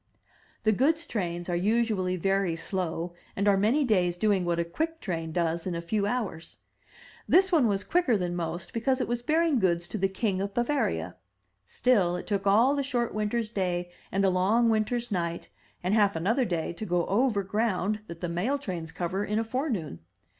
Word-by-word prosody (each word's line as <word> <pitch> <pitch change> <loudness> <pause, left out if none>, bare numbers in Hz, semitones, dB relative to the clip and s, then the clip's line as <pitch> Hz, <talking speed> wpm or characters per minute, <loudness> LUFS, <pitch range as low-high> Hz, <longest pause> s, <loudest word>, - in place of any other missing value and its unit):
The 215 - +4
goods 315 +9 +2
trains 175 - -3
are 175 - -1
usually 205 -1 +1
very 195 -1 +1
slow, 170 0 -3 0.2
and 200 +1 0
are 200 - +6
many 220 +10 +3
days 180 -8 +2
doing 195 -2 +2
what 170 -1 0
a 170 - 0
quick 320 - -3
train 165 -4 -3
does 170 +1 -1
in 180 - -2
a - - -2
few 200 +4 -1
hours. 205 -9 -3 0.7
This 380 +1 +5
one 305 -9 +4
was 200 -2 0
quicker 340 -11 +2
than 175 -2 -2
most, 170 +2 -4
because 260 +3 +1
it - - -1
was 240 0 -1
bearing 315 0 +2
goods 175 -3 +1
to 215 - -4
the 195 +1 +2
King 190 -1 -1
of 200 0 -4
Bavaria; 235 - -1 0.5
still, 195 -9 +2
it 180 - -5
took 200 -1 -1
all 230 +7 +5
the 285 - 0
short 245 -3 -1
winter's 215 +1 -1
day 180 -4 -2 0.2
and 195 +1 +1
the 190 - +4
long 210 +6 +3
winter's 230 +2 0
night 170 -3 -2 0.3
and 185 +3 +1
half 205 -3 +3
another 225 +11 +1
day 170 -5 -2
to 215 - -6
go 175 -1 +1
over 215 -1 +1
ground 210 0 0
that 170 -1 -9
the 175 - -1
mail 180 +12 0
trains 175 - -5
cover 180 +4 -2
in 210 +1 -1
a 225 - +1
forenoon. 225 - -3
200 Hz, 195 wpm, -28 LUFS, 175-235 Hz, 0.7 s, are